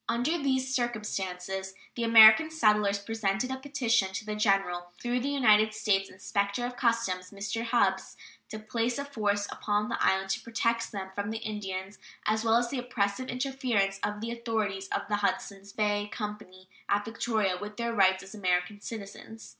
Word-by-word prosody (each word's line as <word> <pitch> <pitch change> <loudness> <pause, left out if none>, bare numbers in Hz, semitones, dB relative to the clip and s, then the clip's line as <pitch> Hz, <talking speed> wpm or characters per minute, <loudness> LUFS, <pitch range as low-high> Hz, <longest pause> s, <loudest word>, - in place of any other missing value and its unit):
Under 245 +8 +1
these 265 -2 0
circumstances 190 -5 -3 0.2
the 235 - -3
American 225 +6 +8
settlers 210 -9 +3
presented 220 +3 -2
a 265 - -2
petition 255 -8 +1
to 210 - -4
the 210 0 -3
General 195 -4 +1
"through 245 +1 -1
the 270 +3 -2
United 215 -6 +4
States 205 -3 +1
inspector 200 +4 -2
of 245 0 -5
customs, 230 -7 0
Mr. 200 +3 -4
Hubbs, 195 -5 +1 0.3
to 215 - -6
place 230 +2 -2
a 280 - -3
force 205 -7 -1
upon 210 0 -1
the - - -1
island 190 0 +2
to - - -1
protect 230 0 -1
them 190 -2 -6
from 205 +1 -3
the 220 - -3
Indians 205 -3 -5 0.3
as 220 +1 +1
well 225 0 +3
as 240 0 0
the 275 - -2
oppressive 245 -1 -1
interference 250 -7 0
of 210 0 -3
the 230 +1 -3
authorities 220 -5 -2
of - - -2
the 210 - 0
Hudsons 200 -1 -2
Bay 205 0 0
Company 210 -4 -7 0.2
at 205 0 +1
Victoria 220 -4 0
with 210 0 -7
their 235 -1 -2
rights 190 -2 +3
as 195 - -11
American 185 0 -1
citizens." 220 +1 -9
210 Hz, 170 wpm, -29 LUFS, 195-235 Hz, 0.3 s, American